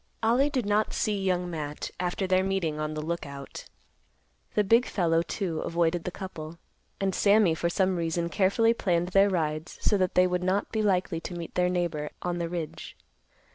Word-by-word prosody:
Ollie 245 +6 +3
did 255 -6 -1
not 210 +1 +1
see 205 -2 0
Young 180 -1 0
Matt 150 -3 -5
after 180 +2 -1
their 185 0 +3
meeting 185 -6 -1
on 155 0 -3
the 155 - -3
Lookout. 140 -4 -6 0.9
The 210 - +4
big 230 +5 +4
fellow, 165 -3 +2
too, 170 -2 -3
avoided 170 +1 0
the - - -1
couple, 170 -4 -8 0.4
and 195 -1 0
Sammy, 200 -2 +4
for 170 +1 -1
some 185 +1 +1
reason, 170 0 -1
carefully 205 +5 +3
planned 175 -6 0
their 195 +2 +5
rides 155 -3 -2
so 205 - +2
that 185 -1 0
they 180 - +6
would 180 0 0
not 190 +2 0
be 220 - 0
likely 185 -4 +1
to 175 - -7
meet 170 -1 -6
their 180 0 +2
neighbor 170 -4 -1
an 175 -1 -2
the 170 -1 -2
ridge. 165 -3 -6
180 Hz, 185 wpm, -28 LUFS, 165-195 Hz, 0.9 s, they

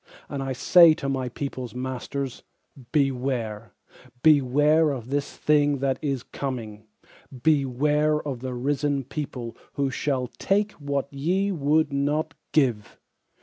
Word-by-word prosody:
And 140 - -4
I 135 0 -3
say 165 +5 +6
to 145 -4 -5
my 130 -2 -1
peopleŌĆÖs 130 -1 -5
masters: 130 +1 -4 0.5
Beware 125 -6 -1 0.5
Beware 150 +2 +4
of 130 -3 -5
the 145 0 +2
thing 145 0 +1
that 135 -1 -1
is 135 -5 -2
coming, 110 -6 -6 0.6
beware 150 +1 +2
of 140 -5 -5
the 130 0 -5
risen 140 +2 0
people 130 -3 -6 0.2
Who 140 -1 -1
shall 130 -1 -1
take 205 - 0
what 140 -2 -3
ye 185 +8 0
would 155 -2 +1
not 150 +3 0 0.2
give. 125 -9 +1
140 Hz, 125 wpm, -25 LUFS, 130-150 Hz, 0.6 s, say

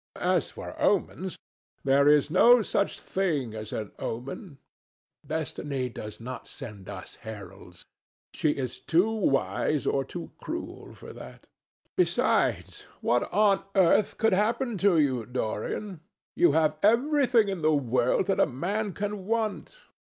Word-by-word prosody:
As - - +1
for - - -8
omens, - - 0 0.5
there 140 +1 +4
is 150 0 +4
no 240 +6 +6
such 200 0 -1
thing 155 - -1
as 110 -1 -7
an 105 -2 -4
omen. 135 - -6 0.7
Destiny 145 -4 -3
does 105 -2 -8
not 125 +1 -7
send 105 -9 -9
us 95 -2 -9
heralds. 95 -4 -11 0.5
She 155 - +1
is 130 -4 -3
too 180 +7 +2
wise 150 -6 0
or 135 - +1
too - - -8
cruel - - -6
for - - -11
that. - - -12 0.5
Besides, - - +1
what 120 - +1
on 200 -1 +3
earth 190 +2 +3
could 225 -2 +2
happen 230 +4 +1
to 195 -3 +4
you, 130 -6 +2
Dorian? 125 - -3 0.4
You 175 -5 +4
have 155 -1 +2
everything 245 0 +3
in 190 -4 -3
the 155 0 +3
world 125 +3 +1
that 195 - 0
a - - +5
man 195 - -2
can 205 -1 -4
want. 225 - -2
155 Hz, 135 wpm, -27 LUFS, 125-205 Hz, 0.7 s, no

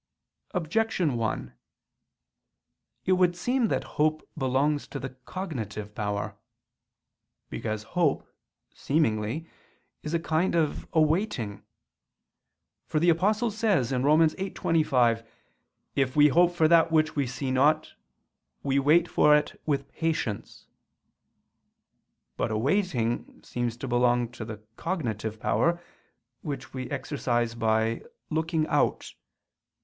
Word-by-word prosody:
Objection 180 - 0
1: 115 -2 -2 1.5
It - - +1
would 180 -1 +3
seem 245 +6 +1
that - - -1 0.2
hope 155 0 +1
belongs 140 +2 0
to 140 - -6
the 135 +1 -5
cognitive 125 - -6
power. 105 -2 -3 1.2
Because 110 -1 -3
hope, 160 +5 0 0.5
seemingly, 135 -1 0 0.6
is 155 +2 -3
a - - +2
kind 165 +2 0
of 160 -3 0
awaiting; 155 - +1 1.3
for 155 - 0
the 170 +3 +3
Apostle 210 +7 +1
says 200 - +1
(Rom. 145 +5 +4
8:25): 155 -9 +2 0.7
"If 135 -2 +1
we 150 0 +7
hope 175 +4 +4
for 160 -2 +4
that 165 0 +5
which 155 -1 +2
we 140 -3 0
see 130 +1 -3
not; 150 +4 +2 0.7
we 140 0 +2
wait 160 +5 +4
for 150 -2 +5
it 150 0 -1
with 140 -2 0
patience." 155 -10 -3 1.7
But - - 0
awaiting 120 - -1
seems 120 -1 -3
to 135 - -5
belong 120 -1 +2
to 120 -2 -8
the 110 -1 -8
cognitive 110 - -3
power, 170 +9 +1 0.6
which 140 -5 -6
we 130 -1 -5
exercise 120 -5 -1
by 110 0 +1 0.3
_looking 160 0 0
out. - - 0
145 Hz, 115 wpm, -27 LUFS, 120-165 Hz, 1.7 s, we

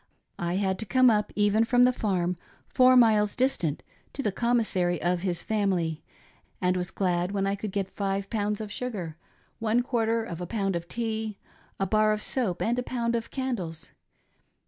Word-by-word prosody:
I 175 +1 -1
had 190 -1 0
to 220 - -3
come 255 0 +5
up, 210 -1 0
even 205 +1 +3
from 245 +1 +4
the 250 0 +5
farm, 180 -6 0 0.3
four 255 -1 +5
miles 215 -3 +4
distant, 215 - 0 0.3
to 275 - -4
the 210 - +1
commissary 205 -7 +1
of 175 0 0
his 180 -2 -1
family, 180 -7 0 0.6
and 180 0 +1
was 180 -1 -2
glad 180 0 -1
when 195 -1 0
I 195 - +1
could 205 0 -4
get 195 -1 -3
five 195 -1 -1
pounds 210 -2 -1
of 210 -1 -6
sugar, 205 -10 -4 0.4
one 230 +2 +1
quarter 230 -2 0
oj 170 - -6
a 175 - -4
pound 195 -3 -1
of 170 0 -4
tea, 220 -1 -3 0.4
a 195 - +1
bar 215 +2 +3
■of 210 - -6
soap 220 -9 0
and 240 +2 +1
a - - +1
pound 235 -1 -1
of 230 -1 -3
candles. 215 - -4
210 Hz, 185 wpm, -27 LUFS, 185-230 Hz, 0.6 s, come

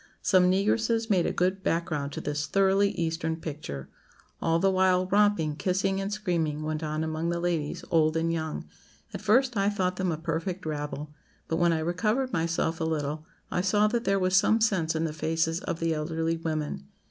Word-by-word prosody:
Some 180 -2 +4
negresses 220 +4 +1
made 180 -4 +3
a - - 0
good 185 +2 0
background 155 -5 -1
to - - -4
this 150 0 -2
thoroughly 195 +1 +3
Eastern 160 -1 -1
picture. 145 - -6 0.5
All 165 0 +2
the 195 +3 +3
while, 185 -1 +3
romping, 195 -6 +2
kissing, 195 +2 0
and 195 +1 -3
screaming 165 -7 -1
went 155 0 -2
on 155 0 -2
among 160 +1 -2
the 170 0 -1
ladies, 170 -4 -2
old 160 -1 +3
and 165 +1 0
young. 160 -1 -3 0.5
At - - -5
first, 245 +4 +3
I 200 0 +2
thought 185 -3 -1
them 185 -2 0
a 160 - -2
perfect 165 +3 -3
rabble; 150 -1 -4 0.3
but 160 - -1
when 170 0 +3
I 165 - +1
recovered 215 +10 0
myself 165 0 0
a - - +1
little, 155 -1 -2 0.2
I - - +1
saw 205 +3 +3
that 235 +1 -1
there 195 0 +2
was 185 -1 +1
some 215 +4 +4
sense 185 -8 +1
in 160 - 0
the 160 -2 -2
faces 165 +1 0
of 165 - -4
the 165 -1 +1
elderly 160 +1 -1
women. 155 - -3
170 Hz, 195 wpm, -27 LUFS, 160-195 Hz, 0.5 s, Some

